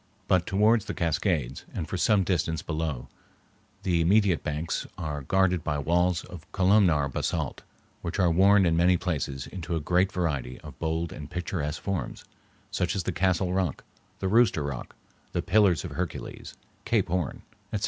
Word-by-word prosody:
But 90 -2 +2
towards 105 +3 +3
the - - -5
Cascades, 80 - -1
and 80 - -3
for - - -4
some 100 +1 +3
distance 80 -3 -1
below 80 -1 -2
them, - - -9 0.8
the 85 -3 +2
immediate 95 0 +3
banks 75 +2 -2
are 75 -4 -4
guarded 90 +3 +2
by 75 - -1
walls 85 +4 +1
of 90 +2 -12
columnar 95 -7 +4
basalt, 65 - -2 0.4
which 85 - -4
are 90 -4 +3
worn 95 +3 +5
in 85 -1 +2
many 90 +2 +4
places 75 -7 -3
into 85 -3 -5
a - - 0
great 90 +5 +2
variety 70 -8 -2
of - - -11
bold 80 0 -2
and 75 0 -8
picturesque 85 -4 -3
forms, 100 -2 -3 0.5
such 90 +4 -1
as 95 - -1
the 90 - -1
Castle 90 0 +1
Rock, 90 -6 -1 0.3
the 95 - -2
Rooster 100 -6 +4
Rock, 70 -4 -5 0.4
the - - -1
Pillars 95 -5 +3
of - - -6
Hercules, - - -5 0.3
Cape - - +1
Horn, 90 -4 -2 0.3
etc. 105 - -1
85 Hz, 170 wpm, -27 LUFS, 80-95 Hz, 0.8 s, worn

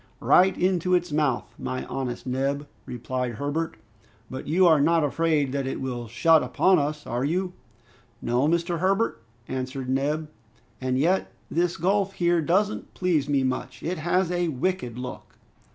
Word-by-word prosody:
"Right 185 +1 +4
into 180 0 +2
its 175 -2 0
mouth, 145 -4 0
my 130 - -3
honest 125 -3 -4
Neb!" 135 +3 -1 0.2
replied 125 0 -3
Herbert, 145 +5 -2 0.5
"but 130 - -6
you 180 +5 +4
are 160 -4 +6
not 165 +2 +3
afraid 150 -2 +1
that 135 -1 -2
it 135 - -3
will 125 -3 -4
shut 155 +8 +4
upon 190 -2 +3
us, 150 +1 -2
are 120 +2 -2
you?" 180 +5 -1 0.7
"No, 125 +4 +1
Mr. 170 +1 0
Herbert," 190 - +1 0.3
answered 130 0 -4
Neb, 145 +4 0 0.5
"and 130 0 0
yet 175 +8 +1 0.2
this 175 +1 +1
gulf 195 +3 +1
here 175 -1 +2
doesn't 195 +7 0
please 160 -6 +1
me 140 -2 +2
much! 130 0 -3
It 175 +1 -2
has 175 +2 +1
a 175 -1 0
wicked 150 -4 -2
look!" 125 0 -8
150 Hz, 155 wpm, -25 LUFS, 130-175 Hz, 0.7 s, are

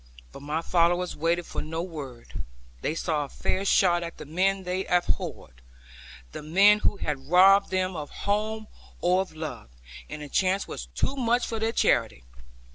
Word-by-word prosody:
But - - -11
my 150 +3 -3
followers 175 +1 +2
waited 170 +2 0
for - - -5
no 160 +2 -4
word; 140 -9 -8 0.4
they 155 - -1
saw 150 -2 -1
a - - -13
fair 190 - -2
shot 180 -3 +3
at 170 0 -6
the - - -9
men 190 +5 0
they 180 +1 -2
abhorred, 65 - -2 0.7
the - - -7
men 195 +7 +5
who 205 - +1
had 145 -5 -4
robbed 195 +3 +6
them 185 -1 -1
of 150 -2 -5
home 215 +2 -2 0.3
or 180 +2 +3
of 190 -4 -7
love, 155 - -6 0.4
and 150 - -7
the - - -7
chance 190 +5 +1
was - - -7
too 165 - -2
much 245 -2 +1
for 225 - -4
their 225 +1 0
charity. 65 - +1
180 Hz, 175 wpm, -26 LUFS, 155-195 Hz, 0.7 s, robbed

